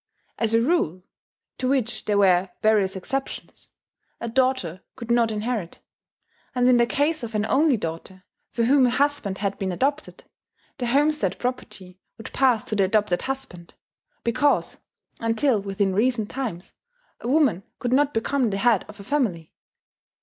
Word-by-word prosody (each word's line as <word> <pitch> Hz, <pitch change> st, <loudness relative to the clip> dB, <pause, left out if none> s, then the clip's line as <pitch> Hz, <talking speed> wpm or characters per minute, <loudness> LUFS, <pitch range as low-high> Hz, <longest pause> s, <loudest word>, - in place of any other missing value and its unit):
As 225 Hz, -1 st, +1 dB
a 230 Hz, -, +4 dB
rule, 185 Hz, -, 0 dB, 0.6 s
to 255 Hz, -, -1 dB
which 255 Hz, -3 st, -1 dB
there 205 Hz, -1 st, +1 dB
were 190 Hz, -2 st, +4 dB
various 210 Hz, -3 st, +3 dB
exceptions, 270 Hz, +9 st, -5 dB, 0.5 s
a 235 Hz, -, -4 dB
daughter 240 Hz, -8 st, 0 dB
could 235 Hz, -2 st, -6 dB
not 235 Hz, -1 st, +3 dB
inherit; 215 Hz, -4 st, -3 dB, 0.8 s
and 250 Hz, 0 st, +3 dB
in 250 Hz, -1 st, +6 dB
the 235 Hz, 0 st, +3 dB
case 295 Hz, +6 st, 0 dB
of 230 Hz, -2 st, -6 dB
an 210 Hz, 0 st, +1 dB
only 275 Hz, +3 st, +3 dB
daughter, 175 Hz, +1 st, -6 dB, 0.3 s
for 235 Hz, -, -1 dB
whom 260 Hz, +2 st, +5 dB
a -, -, +2 dB
husband 275 Hz, -7 st, 0 dB
had 200 Hz, -1 st, -3 dB
been 190 Hz, -1 st, -2 dB
adopted, 280 Hz, -, -2 dB, 0.6 s
the 245 Hz, -, -1 dB
homestead 280 Hz, -7 st, +1 dB
property 190 Hz, -7 st, -5 dB, 0.2 s
would 225 Hz, -, -10 dB
pass 255 Hz, -5 st, +3 dB
to 215 Hz, -, -4 dB
the 200 Hz, -2 st, +3 dB
adopted 205 Hz, -2 st, +1 dB
husband, 260 Hz, -11 st, -6 dB, 0.5 s
because 285 Hz, +5 st, +1 dB, 0.4 s
(until 230 Hz, 0 st, +1 dB
within 195 Hz, -1 st, -1 dB
recent 225 Hz, +1 st, +1 dB
times) 230 Hz, -10 st, -5 dB, 0.5 s
a -, -, -6 dB
woman 265 Hz, -, +3 dB, 0.2 s
could 245 Hz, 0 st, -2 dB
not 285 Hz, +2 st, +3 dB
become 250 Hz, +1 st, 0 dB
the 195 Hz, -, -2 dB
head 225 Hz, -1 st, +3 dB
of 210 Hz, 0 st, -13 dB
a -, -, -9 dB
family. 205 Hz, -, -1 dB
230 Hz, 155 wpm, -24 LUFS, 195-260 Hz, 0.8 s, in